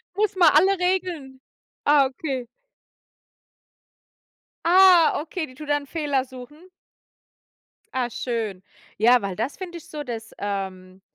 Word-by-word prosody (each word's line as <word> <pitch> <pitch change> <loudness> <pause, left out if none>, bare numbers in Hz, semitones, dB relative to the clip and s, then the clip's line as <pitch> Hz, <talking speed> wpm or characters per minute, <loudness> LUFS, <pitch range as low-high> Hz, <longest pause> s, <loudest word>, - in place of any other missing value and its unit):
Muss 415 0 0
man 350 -4 +6
alle 380 +5 +4
Regeln 350 -8 -2 0.4
ah, 290 -1 +5
okay. 265 -2 -5 2.2
Ah, 360 -2 +6
okay, 320 +2 -4
die 255 - -15
tut 300 +1 -10
dann 290 -1 0
Fehler 285 -3 -1
suchen? 260 +2 -12 1.4
Ah, 250 -2 -1
schön. 220 -7 -4 0.3
Ja, 240 +3 +5
weil 195 -2 -4
das 230 +8 -3
finde 355 -2 -7
ich 330 - -13
so 300 -1 -6
das, 230 -3 -7
ähm 190 -2 -5
280 Hz, 125 wpm, -23 LUFS, 240-335 Hz, 2.2 s, man